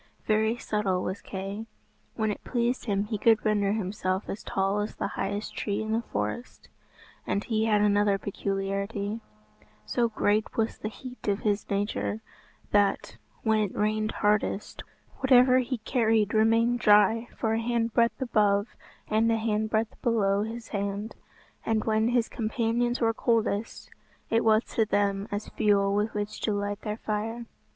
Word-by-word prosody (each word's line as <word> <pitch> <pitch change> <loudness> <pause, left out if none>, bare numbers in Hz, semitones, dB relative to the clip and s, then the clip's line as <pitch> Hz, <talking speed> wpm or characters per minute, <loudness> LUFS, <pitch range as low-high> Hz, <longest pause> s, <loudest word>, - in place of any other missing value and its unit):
Very 220 +2 +2
subtle 200 -5 -1
was 190 +2 -4
Kay. 195 +3 -6 0.5
When 220 -2 0
it - - -7
pleased 240 +1 -1
him 200 -3 0
he 210 0 -4
could 225 0 +4
render 205 -2 +2
himself 190 -2 -2
as 200 - -4
tall 195 +1 0
as 205 +1 -3
the - - -2
highest 205 +2 -3
tree 205 -1 -2
in 220 - -4
the 225 +1 +1
forest. 105 - -5 0.6
And 200 - 0
he 220 -1 0
had 210 -2 +3
another 205 -1 +3
peculiarity 200 +2 -3 0.6
so 235 - +1
great 215 -1 0
was 225 -1 0
the 215 - -3
heat 250 +3 -10
of 200 0 +1
his 205 -1 -1
nature, 205 +2 -2 0.5
that, 200 - +1 0.3
when 220 -1 +3
it 205 -3 -1
rained 215 +1 0
hardest, 210 -1 0 0.4
whatever 255 -1 +6
he 255 0 -2
carried 220 -2 +1
remained 230 +2 +3
dry 215 +2 +4
for 220 -1 0
a 225 - +1
handbreadth 235 0 +1
above 210 -4 +2 0.4
and 220 +1 +2
a 225 - +2
handbreadth 220 0 -1
below 200 -4 +2
his 225 +2 -5
hand; 200 +1 -3 0.5
and 220 -1 0
when 220 0 +2
his 240 -1 +2
companions 235 +2 -1
were 225 -1 +2
coldest, 225 -2 -1 0.4
it 225 +1 +3
was 220 0 +4
to 225 - 0
them 200 -1 0
as 205 +1 -4
fuel 200 -1 +2
with 210 +2 0
which 205 0 -4
to 215 - 0
light 205 0 -2
their 210 -1 -4
fire. 225 +2 -3
215 Hz, 155 wpm, -27 LUFS, 205-225 Hz, 0.6 s, whatever